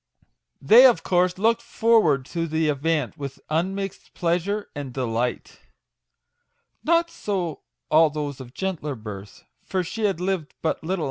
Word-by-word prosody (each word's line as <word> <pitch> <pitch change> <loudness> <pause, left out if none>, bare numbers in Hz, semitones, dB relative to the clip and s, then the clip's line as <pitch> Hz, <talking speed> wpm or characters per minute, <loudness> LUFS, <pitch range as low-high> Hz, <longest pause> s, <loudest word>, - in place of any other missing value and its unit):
They, 235 - +8
of 245 - +2
course, 180 0 +2
looked 225 +3 +2
forward 210 - +3
to 165 -1 -1
the 160 0 0
event 150 0 -1
with 140 -1 -6
un 175 +5 0
mixed 195 -1 -6
pleasure 180 +5 -1
and 145 -3 -6
delight. 120 -1 -2 1.2
Not 335 +1 +2
so 180 -7 -3 0.3
all 160 0 +6
those 145 -2 -4
of 125 -2 -10
gentler 170 -7 -3
birth; 105 -3 -9 0.2
for 185 -1 -1
she 215 +5 -3
had 195 -5 0
lived 180 -4 -2
but 160 - +1
little - - -30
44 - - -34
MAGIC - - -12
WORDS. 185 +2 -1
165 Hz, 160 wpm, -24 LUFS, 145-195 Hz, 1.2 s, They